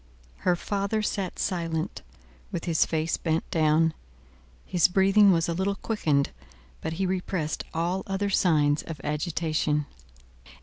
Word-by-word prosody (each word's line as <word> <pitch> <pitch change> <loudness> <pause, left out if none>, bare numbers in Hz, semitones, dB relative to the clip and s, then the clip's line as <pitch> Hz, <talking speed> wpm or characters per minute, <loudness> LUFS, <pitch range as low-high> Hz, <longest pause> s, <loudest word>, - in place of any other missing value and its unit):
Her 180 - +2
father 200 +4 -1
sat 195 -3 -2
silent, 165 -3 -2 0.5
with 170 - -4
his 165 -3 +2
face 160 0 0
bent 160 -1 -1
down. 160 0 +3 0.7
His 175 -3 +3
breathing 195 +2 +5
was 165 -2 +2
a 170 - 0
little 190 +3 0
quickened; 155 -11 0 0.5
but - - -3
he 190 +4 -1
repressed 180 -4 -2
all 175 +4 -1
other 195 +1 -1
signs 150 -6 +3
of 160 -3 -8
agitation. 150 -1 0
170 Hz, 130 wpm, -27 LUFS, 160-190 Hz, 0.7 s, breathing